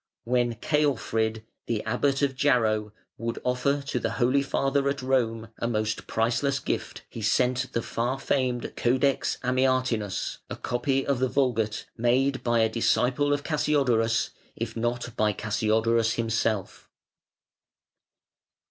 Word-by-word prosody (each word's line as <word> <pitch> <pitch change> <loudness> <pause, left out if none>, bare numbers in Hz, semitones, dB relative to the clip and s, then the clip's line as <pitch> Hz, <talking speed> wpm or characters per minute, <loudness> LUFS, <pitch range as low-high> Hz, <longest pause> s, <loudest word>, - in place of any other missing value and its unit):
When 120 -1 +1
Ceolfrid, 115 -7 0 0.2
the 115 -3 -1
Abbot 135 +5 0
of 135 -2 +1
Jarrow, 110 -6 +2 0.3
would 115 0 -3
offer 135 +3 0
to 140 - -2
the - - -2
Holy 130 +2 +2
Father 140 0 +1
at 140 -2 -3
Rome 115 -4 0
a 115 - -1
most 110 -2 -2
priceless 120 +5 +1
gift, - - -4
he 115 - -8
sent 125 +4 +1
the 115 - -1
far 125 +3 -2
famed 130 -3 -1
Codex 130 +3 +1
Amiatinus, 130 -5 0
a - - -4
copy 135 +2 -1
of 140 -3 0
the 130 0 +1
Vulgate, 115 -6 0
made 130 +3 +2
by 120 -1 +2
a 110 - +4
disciple 125 +5 +1
of 145 0 0
Cassiodorus, 125 -7 +1 0.2
if 115 -1 -4
not 120 0 -2
by 105 -1 +2
Cassiodorus 110 +2 +1
himself. 115 -3 -1
120 Hz, 130 wpm, -26 LUFS, 115-135 Hz, 0.3 s, a